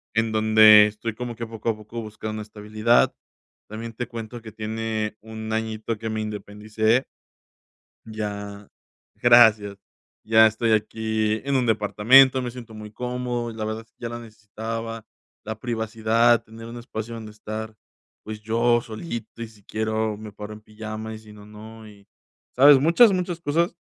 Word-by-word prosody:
en 110 0 +1
donde 110 -1 +7
estoy 110 +1 -5
como 120 -1 -5
que 115 0 -5
poco 115 0 -4
a 115 - 0
poco 110 +2 -8
buscando 110 0 -7
una 110 - -5
estabilidad. 110 +2 +1 0.6
También 115 +2 -7
te 120 +1 -5
cuento 115 0 -8
que 110 -1 -10
tiene 110 0 -3
1 110 0 -7
añito 110 0 -3
que 110 +1 -5
me 110 0 -2
independicé. 110 +3 -1 1.0
Ya 105 -2 -6 0.5
gracias. 110 -4 +5 0.5
Ya 110 0 +6
estoy 110 +1 -1
aquí 110 0 -1
en 140 0 -1
un 125 -2 +2
departamento. 115 +5 +5
Me 125 -1 -4
siento 115 -3 -11
muy 105 0 -9
cómodo 125 0 -3
y - - -11
la 110 -1 -4
verdad 110 +1 -4
es - - -38
que - - -66
ya 115 - -3
lo 120 - -6
necesitaba, 115 +1 -7 0.4
la 110 0 -6
privacidad, 115 0 +1
tener 115 +1 -11
un 115 +1 -8
espacio 115 -1 -6
donde 110 -1 -8
estar, 110 +1 -7 0.5
pues, 110 0 -7
yo 115 +2 +2
solito 115 -1 -7
y 115 - -4
si 110 -2 -20
quiero 110 0 -2
me 110 0 -9
paro 105 +1 -8
en 105 - -12
pijama 110 +1 -7
y - - -10
si 110 -1 -15
no, 105 -1 -14
no, 110 +1 -12
y, 100 -1 -18 0.5
¿sabes? 140 +1 +8
Muchas, 170 - +6
muchas 180 -2 -2
cosas. 170 +4 0
110 Hz, 170 wpm, -24 LUFS, 110-115 Hz, 1.0 s, sabes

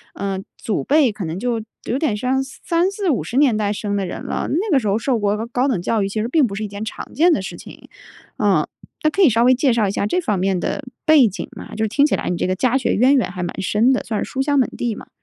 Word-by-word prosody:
呃， 195 -1 -3 0.2
祖 215 - -2
辈 285 -4 +3
可 205 -3 -6
能 160 +2 -4
就 235 0 -1 0.2
有 255 - -1
点 290 -9 0
像 255 +4 0
30、40、50 340 - -1
年 275 -5 +4
代 205 -1 0
生 205 -1 -3
的 200 -1 -1
人 180 - -6
了。 - - -3
那 375 +7 -1
个 280 - +5
时 215 - -3
候 200 +1 +2
受 235 +1 0
过 210 +2 0
高 250 +3 0
等 230 -11 0
教 215 +4 0
育 195 - -1
其 215 +2 -2
实 225 - -1
并 275 +1 +3
不 200 - -6
是 215 - -4
一 - - -2
件 205 +1 -6
常 220 - -7
见 340 +4 +4
的 200 - 0
事 190 - -6
情。 - - -13 0.5
嗯， - - +2 0.4
那 310 - +4
可 385 - -1
以 350 - +7
稍 230 0 +2
微 255 +1 +6
介 260 0 +2
绍 225 -3 +2
一 - - -1
下 200 - -1
这 360 +12 0
方 210 - -1
面 190 0 +1
的 285 +10 -3 0.2
背 310 -6 +6
景 190 -3 -5
吗？ - - -9
就 220 - -1
是 - - +2
听 280 +6 +3
起 - - +2
来 - - -3
你 180 - -1
这 - - -1
个 185 - 0
家 255 +5 +2
学 260 - 0
渊 255 +6 +4
源 250 -8 +1
还 180 -1 -5
蛮 175 - -5
深 215 +6 +2
的， 255 - -1
算 215 -3 -2
是 - - -8
书 265 - -2
香 285 +1 +1
门 260 - +2
第 235 -3 -2
嘛。 - - -12
230 Hz, 305 characters per minute, -20 LUFS, 205-275 Hz, 0.5 s, 以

